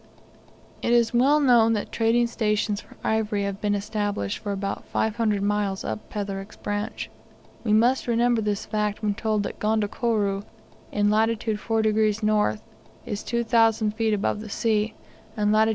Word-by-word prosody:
It 235 Hz, -, +1 dB
is 235 Hz, -1 st, +3 dB
well 270 Hz, +5 st, +4 dB
known 240 Hz, -5 st, +5 dB
that 210 Hz, -, -3 dB
trading 230 Hz, +1 st, +2 dB
stations 210 Hz, -3 st, 0 dB
for -, -, -18 dB
ivory 215 Hz, -2 st, 0 dB
have 200 Hz, 0 st, -4 dB
been 205 Hz, -1 st, +1 dB
established 205 Hz, -, -2 dB
for 205 Hz, -, -4 dB
about 195 Hz, 0 st, -3 dB
500 220 Hz, -2 st, 0 dB
miles 205 Hz, -1 st, 0 dB
up 110 Hz, 0 st, -5 dB
Petherick's 200 Hz, -1 st, -5 dB
branch. 205 Hz, +1 st, -4 dB, 0.5 s
We 220 Hz, -, 0 dB
must 240 Hz, +5 st, +3 dB
remember 235 Hz, 0 st, +2 dB
this 205 Hz, -1 st, -2 dB
fact 210 Hz, 0 st, -2 dB
when 210 Hz, -1 st, +1 dB
told 215 Hz, -1 st, -1 dB
that -, -, -6 dB
Gondokoro, 210 Hz, -1 st, 0 dB, 0.5 s
in 205 Hz, 0 st, +2 dB
lat. 220 Hz, +1 st, +3 dB
4 220 Hz, 0 st, 0 dB
degrees 215 Hz, 0 st, +2 dB
N., 210 Hz, -, +2 dB, 0.5 s
is 205 Hz, -1 st, -4 dB
2,000 225 Hz, -2 st, +2 dB
feet 220 Hz, 0 st, 0 dB
above 205 Hz, +1 st, -1 dB
the 215 Hz, -, -8 dB
sea, 215 Hz, 0 st, 0 dB, 0.4 s
and 210 Hz, 0 st, +2 dB
lat. 220 Hz, +1 st, +4 dB
215 Hz, 155 wpm, -25 LUFS, 205-225 Hz, 0.5 s, known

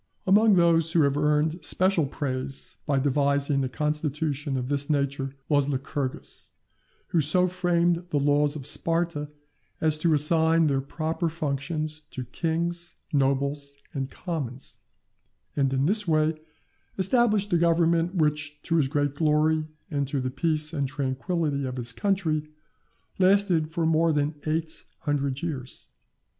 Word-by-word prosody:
Among 205 Hz, +2 st, +5 dB
those 165 Hz, -2 st, +3 dB
who 165 Hz, -, +4 dB
have 140 Hz, -1 st, +2 dB
earned 150 Hz, +2 st, +1 dB
special 180 Hz, -1 st, +3 dB
praise 135 Hz, -1 st, -4 dB
by 140 Hz, -, +2 dB
devising 140 Hz, 0 st, +1 dB
a 130 Hz, -, -2 dB
constitution 150 Hz, +1 st, -2 dB
of 125 Hz, -1 st, -3 dB
this 140 Hz, +1 st, -1 dB
nature, 140 Hz, -2 st, -1 dB
was 145 Hz, -2 st, +2 dB
Lycurgus, 135 Hz, -1 st, -4 dB, 0.6 s
who 165 Hz, -, +2 dB
so 180 Hz, +5 st, +2 dB
framed 175 Hz, -1 st, +1 dB
the 150 Hz, -, 0 dB
laws 145 Hz, +1 st, +2 dB
of 140 Hz, -4 st, -7 dB
Sparta 165 Hz, -1 st, 0 dB, 0.5 s
as 155 Hz, -1 st, +2 dB
to 160 Hz, -1 st, +3 dB
assign 160 Hz, +2 st, +4 dB
their 135 Hz, -3 st, +1 dB
proper 160 Hz, +4 st, -2 dB
functions 155 Hz, 0 st, -3 dB
to 130 Hz, -, -6 dB
kings, 170 Hz, +5 st, -3 dB, 0.2 s
nobles, 140 Hz, +1 st, 0 dB, 0.2 s
and 135 Hz, -2 st, -3 dB
commons; 140 Hz, -8 st, -5 dB, 0.8 s
and 135 Hz, -2 st, +1 dB
in 135 Hz, +1 st, +1 dB
this 205 Hz, +3 st, +2 dB
way 155 Hz, 0 st, +2 dB, 0.6 s
established 205 Hz, 0 st, +2 dB
a -, -, +5 dB
government, 170 Hz, +1 st, +2 dB
which, 150 Hz, -2 st, 0 dB
to 165 Hz, -, 0 dB
his 145 Hz, -4 st, +3 dB
great 145 Hz, 0 st, 0 dB
glory 155 Hz, +1 st, +2 dB, 0.2 s
and 140 Hz, -2 st, -1 dB
to 140 Hz, +1 st, -2 dB
the 130 Hz, 0 st, -2 dB
peace 155 Hz, +3 st, 0 dB
and 140 Hz, -3 st, -1 dB
tranquility 140 Hz, +2 st, -2 dB
of 130 Hz, -1 st, -4 dB
his 120 Hz, -1 st, -2 dB
country, 155 Hz, -, -1 dB, 0.7 s
lasted 185 Hz, -4 st, +3 dB
for 165 Hz, 0 st, -1 dB
more 165 Hz, +1 st, +3 dB
than 145 Hz, 0 st, 0 dB
eight 160 Hz, +1 st, -2 dB, 0.2 s
hundred 140 Hz, -2 st, -1 dB
years. 135 Hz, -7 st, -5 dB
150 Hz, 140 wpm, -26 LUFS, 140-165 Hz, 0.8 s, Among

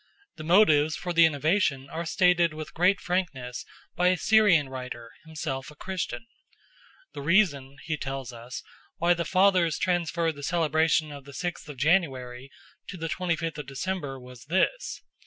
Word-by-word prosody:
The 155 Hz, -, -7 dB
motives 155 Hz, -4 st, +4 dB
for 175 Hz, -1 st, -4 dB
the 165 Hz, -1 st, +7 dB
innovation 145 Hz, -2 st, 0 dB
are 165 Hz, +3 st, -5 dB
stated 175 Hz, -2 st, +3 dB
with 155 Hz, 0 st, -7 dB
great 180 Hz, +3 st, +3 dB
frankness 150 Hz, -9 st, -3 dB, 0.3 s
by 180 Hz, +1 st, +2 dB
a 180 Hz, 0 st, +3 dB
Syrian 200 Hz, -8 st, +4 dB
writer, 125 Hz, -3 st, -7 dB, 0.2 s
himself 135 Hz, -4 st, -5 dB
a 150 Hz, -, -14 dB
Christian. 190 Hz, +6 st, -4 dB, 0.9 s
"The -, -, -6 dB
reason," 145 Hz, -5 st, +2 dB
he 155 Hz, -2 st, -2 dB
tells 135 Hz, -3 st, -5 dB
us, 120 Hz, +2 st, -8 dB, 0.3 s
"why 175 Hz, +1 st, +3 dB
the 170 Hz, -1 st, -3 dB
fathers 185 Hz, -3 st, +3 dB
transferred 170 Hz, -2 st, 0 dB
the -, -, -8 dB
celebration 160 Hz, 0 st, +1 dB
of 140 Hz, -2 st, -10 dB
the 140 Hz, -, -12 dB
sixth 175 Hz, +1 st, -5 dB
of 145 Hz, -, -8 dB
January 135 Hz, -5 st, 0 dB, 0.4 s
to 190 Hz, -, -7 dB
the 165 Hz, -1 st, -4 dB
twenty 180 Hz, 0 st, -1 dB
fifth 165 Hz, -1 st, -4 dB
of 145 Hz, -, -7 dB
December 140 Hz, -1 st, -4 dB
was 125 Hz, -1 st, -13 dB
this. 190 Hz, -, -1 dB
160 Hz, 160 wpm, -27 LUFS, 135-175 Hz, 0.9 s, the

